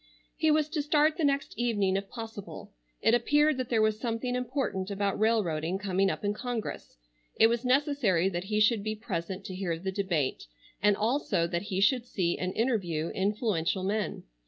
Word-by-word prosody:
He 315 - +2
was 305 -1 +3
to 305 -1 -1
start 300 +1 +2
the 330 - -1
next 280 -1 +1
evening 205 -6 +1
if 195 0 -3
possible. 225 -4 -8 0.3
It - - +4
appeared 295 +5 +3
that 255 -2 -3
there 225 -2 +3
was 215 0 +1
something 240 +1 -2
important 250 -7 -2
about 200 0 -1
railroading 185 -6 +1
coming 195 -1 +1
up 205 - -3
in 205 - +1
Congress. 235 - -5 0.4
It - - +6
was 235 +1 +2
necessary 255 - +2
that 180 -1 -3
he 210 +1 0
should 215 0 +4
be 215 0 -2
present 190 -3 -5
to 185 - -6
hear 180 -3 -2
the 190 +3 -3
debate, 180 - -1 0.3
and 205 0 +4
also 225 -6 +1
that 170 0 -2
he 190 -1 -1
should 245 +4 +3
see 175 -7 0
and 180 0 -2
interview 180 -10 0
influential 195 -3 0
men. 205 +2 -2
210 Hz, 180 wpm, -29 LUFS, 190-245 Hz, 0.4 s, It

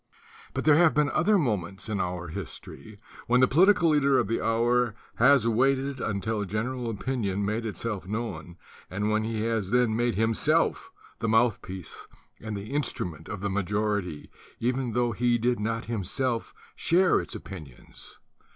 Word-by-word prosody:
But - - -1
there 155 -1 +5
have 170 -1 +5
been 150 -1 +2
other 205 +6 +3
moments 100 - -2
in 105 -2 -2
our 90 -1 -3
history 105 +5 -9 0.3
when 125 +1 +4
the 130 - +6
political 175 +3 +5
leader 140 -2 +3
of 115 - +1
the 115 - -1
hour 120 0 +2 0.2
has 130 -1 +5
waited 135 +3 +1
until 105 0 -2
general 115 +5 -3
opinion 105 -3 -2
made 110 +3 -2
itself 105 -3 -4
known 95 -6 -5 0.3
and 105 +4 -1
when 110 0 +1
he 110 -1 -2
has 110 -4 -1
then 120 -1 +2
made 120 -1 +1
himself 110 +1 +1 0.3
the 115 - -1
mouth 115 -1 +3
piece 90 -3 -9 0.4
and 110 -2 -4
the 100 +4 -7
instrument 90 - -3
of 105 -3 -5
the 100 - -1
majority 100 -4 -2 0.3
even 125 0 -1
tho 120 0 +1
he 120 +2 +1
did 120 0 0
not 115 +2 -2
himself 115 +3 -2 0.2
share 180 +2 +3
its - - -8
opinions. 80 - -11
115 Hz, 160 wpm, -27 LUFS, 100-125 Hz, 0.4 s, the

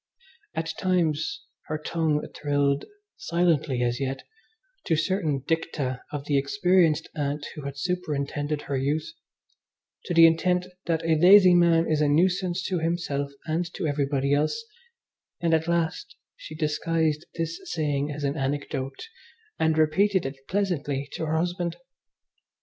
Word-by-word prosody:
At 165 0 -2
times 180 - 0 0.2
her 155 - -2
tongue 155 -1 -1
thrilled, 145 -1 +1 0.3
silently 165 - +1
as 120 +1 0
yet, 135 0 -3 0.6
to 165 - +2
certain 155 -4 0
dicta 145 -6 -1
of 145 -1 -5
the 145 -2 +2
experienced 170 0 +2
Aunt 145 -1 -2
who 150 -3 -8
had 140 0 -5
superintended 150 -3 -2
her 140 - -3
youth, 145 +4 0 1.0
to 175 - -2
the 165 0 +9
intent 180 +2 +3 0.2
that 165 -1 0
a 160 -2 +2
lazy 185 +1 +8
man 170 -1 +4
is 155 -1 +1
a 150 - +3
nuisance 180 +4 +2
to 185 -3 -1
himself 160 -4 -2
and 165 +2 -1
to - - -3
everybody 140 -2 0
else; 155 - 0 0.7
and, 170 -2 +1
at 160 0 +2
last, 170 -2 -1 0.2
she 155 - -10
disguised 155 0 0
this 165 0 -3
saying 145 -2 -1
as 145 0 -6
an 140 +1 0
anecdote 140 - -3 0.5
and 160 0 +2
repeated 190 +4 +3
it 135 0 -7
pleasantly 145 -8 -1
to 160 - -4
her 160 +1 0
husband. 175 0 -1
155 Hz, 140 wpm, -26 LUFS, 145-170 Hz, 1.0 s, the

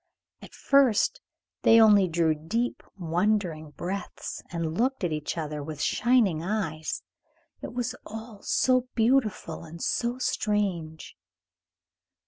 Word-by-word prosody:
At - - -13
first 275 -6 +3 0.4
they 230 - +6
only 205 -4 +6
drew 165 -1 +2
deep, 215 +11 -2 0.2
wondering 175 -2 0
breaths, 180 +5 -5
and 165 -2 -3
looked 255 +2 0
at 175 - 0
each 150 +2 -3
other 150 -2 -3
with 150 0 -7
shining 215 -2 +2
eyes. 170 -5 -3 0.6
It - - -7
was 245 -2 -1
all 220 -1 -9
so 255 -1 +2
beautiful 225 -9 +1
and 165 +1 -10
so 240 +7 -1
strange. 195 -10 -2
195 Hz, 115 wpm, -27 LUFS, 160-225 Hz, 0.6 s, they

